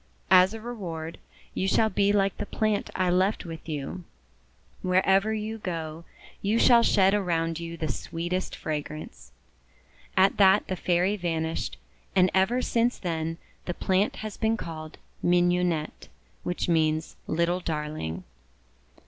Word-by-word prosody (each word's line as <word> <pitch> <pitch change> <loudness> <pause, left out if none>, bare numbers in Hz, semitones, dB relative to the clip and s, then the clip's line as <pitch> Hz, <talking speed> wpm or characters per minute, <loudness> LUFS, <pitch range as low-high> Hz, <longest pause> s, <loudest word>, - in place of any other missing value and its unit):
"As 185 +3 +6
a - - -6
reward, 175 -9 -6 0.3
you 190 - -1
shall 220 +3 +3
be 200 +1 +3
like 195 -2 +2
the - - -4
plant 215 -2 0
I 185 -1 +2
left 185 +3 +1
with 165 -1 -8
you; 150 +4 -4 0.8
wherever 190 +3 +3
you 220 +1 -3
go, 165 -3 -5 0.4
you 210 +3 +1
shall 235 0 +6
shed 195 -4 +4
around 165 -5 0
you 170 0 -6
the 160 - -2
sweetest 175 +6 -3
fragrance." 155 0 -6 0.9
At 190 +1 +4
that 190 -2 +5
the 185 - -3
Fairy 180 +3 +1
vanished; 165 -3 -2 0.4
and 185 -1 +5
ever 220 +7 +2
since 235 +1 +1
then 165 -2 -3 0.3
the 175 - -3
plant 190 +2 +1
has 215 - -6
been 220 0 +1
called 155 -4 -7 0.2
Mignonette, 175 -2 +1 0.3
which 180 - -2
means 155 -2 +1
Little 170 +2 +1
Darling. 150 - -4
180 Hz, 135 wpm, -27 LUFS, 165-195 Hz, 0.9 s, As